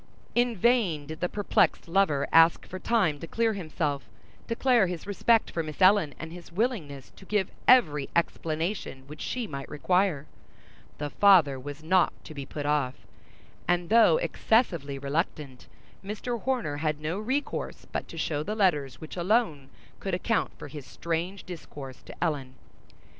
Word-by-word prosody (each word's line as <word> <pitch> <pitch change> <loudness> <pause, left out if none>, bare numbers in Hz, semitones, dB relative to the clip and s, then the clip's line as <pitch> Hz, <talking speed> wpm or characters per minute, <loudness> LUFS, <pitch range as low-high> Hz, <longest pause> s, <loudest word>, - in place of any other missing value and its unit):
In 240 -2 +2
vain 190 -9 +2
did 155 +2 -8
the 180 - -1
perplexed 205 -3 +1
lover 165 -6 +2
ask 165 +1 +6
for 185 - -7
time 185 -10 +1
to 165 - -7
clear 225 +2 +1
himself, 155 -6 -2 0.4
declare 235 -3 +3
his 175 -2 -5
respect 220 +3 +2
for 165 - -1
Miss 155 -2 -7
Ellen 185 -5 +5
and 160 +1 -7
his 175 0 -11
willingness 170 - -2
to - - -16
give 195 -1 -1 0.2
every 150 - +5
explanation 165 -3 -2
which 150 +2 -10
she 250 -2 -2
might 140 -8 -7
require; 180 -2 +1 0.7
the 145 -1 -4
father 170 -10 +5
was 145 +3 -8
not 180 +2 +3
to 155 - -10
be 140 -2 -7
put 145 -1 -5
off; 145 -3 -1 0.6
and 175 -1 +1
though 230 - +6
excessively 185 - +1
reluctant, 140 -2 -3 0.4
Mr. 215 +3 -4
Horner 245 - -1
had 150 0 -1
no 160 +5 -3
resource 265 +7 -3
but - - -3
to 165 - -10
show 150 -2 -1
the 210 +8 -3
letters 150 - +1
which 155 - -8
alone 175 - +1 0.3
could 195 -2 -2
account 225 +5 0
for - - -8
his 145 0 -8
strange 170 +4 -3
discourse 145 -6 -9
to - - -7
Ellen. 140 -6 -2
170 Hz, 160 wpm, -28 LUFS, 145-205 Hz, 0.7 s, ask